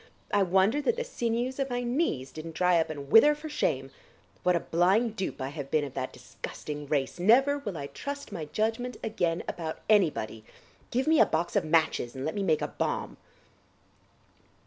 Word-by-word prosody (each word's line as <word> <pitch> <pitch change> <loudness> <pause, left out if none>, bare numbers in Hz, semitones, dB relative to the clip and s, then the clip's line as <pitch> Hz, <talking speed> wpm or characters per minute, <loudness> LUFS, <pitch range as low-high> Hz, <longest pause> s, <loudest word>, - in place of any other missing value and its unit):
I 205 - +4
wonder 195 +8 +3
that 460 - +1
the 485 - -2
sinews 245 - -2
of 270 0 0
my 245 0 -2
knees 240 - -1
didn't 160 +1 -8
dry 180 -1 +3
up 160 - 0
and 140 -2 -7
wither 295 +7 +7
for 305 +1 -8
shame. 135 - -1 0.5
What 180 0 +3
a - - +2
blind 195 +7 +2
dupe 190 - -3
I 130 - -3
have 145 -2 -6
been 155 0 +2
of 140 -3 -6
that 130 -1 -3
disgusting 150 -1 -7
race! 140 +1 -1
Never 270 +9 +4
will 205 -10 -5
I 140 - -4
trust 280 - -6
my 170 -6 -4
judgment 225 +8 -2
again 175 -6 -1
about 160 -2 -4
anybody.... 155 - +2 0.5
Give 255 +2 0
me 315 0 +4
a - - +8
box 165 +2 -1
of - - +2
matches 155 -6 +1
and 130 +1 -4
let 160 - -1
me 205 - -2
make 160 -6 +1
a - - 0
bomb." - - -3
180 Hz, 190 wpm, -28 LUFS, 155-245 Hz, 0.5 s, a